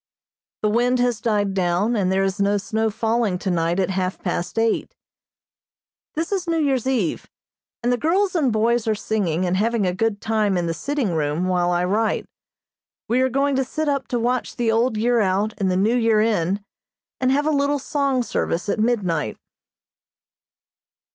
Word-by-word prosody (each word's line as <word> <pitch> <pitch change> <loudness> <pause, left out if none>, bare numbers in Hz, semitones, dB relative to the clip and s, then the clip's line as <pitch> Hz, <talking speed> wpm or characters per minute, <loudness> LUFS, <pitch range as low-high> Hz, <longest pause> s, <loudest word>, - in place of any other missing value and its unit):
The 210 - +3
wind 245 +3 +2
has 245 -3 0
died 205 -4 0
down, 190 +5 +1
and 190 -4 +1
there 190 +1 +2
is 195 +1 -1
no 200 +1 +2
snow 220 +2 -1
falling 225 -2 0
tonight 175 -1 0
at 190 0 +1
half 185 0 -1
past 175 +2 -3
eight. 225 0 0 1.2
This 325 +4 -2
is 375 -3 -1
New 335 -1 +1
Year's 270 -5 +1
Eve, 230 -11 -1 0.5
and 240 - +2
the - - +1
girls 370 - +1
and 300 -8 +2
boys 225 +1 +1
are 220 - +2
singing, 190 -5 -1
and 180 +1 0
having 225 0 +1
a 180 - 0
good 210 +2 -1
time 215 -3 0
in 175 - 0
the 165 - -1
sitting 270 - -2
room 155 +3 -1
while 180 -1 +1
I 175 0 +1
write. 215 +4 0 0.8
We 245 +3 +2
are 260 - +2
going 275 +2 +1
to 265 - +2
sit 305 +4 -3
up 275 -3 0
to 245 - -1
watch 245 +2 -1
the 235 -3 +1
old 230 0 +1
year 235 +2 +2
out 200 +2 +1
and 195 -2 +1
the 180 - +1
new 215 +5 +2
year 225 -3 +3
in, 205 -2 0 0.5
and 255 0 +2
have 290 +2 +1
a 310 - +2
little 285 0 +1
song 275 -2 0
service 175 -6 -2
at - - 0
midnight. 185 - 0
220 Hz, 185 wpm, -22 LUFS, 190-250 Hz, 1.2 s, The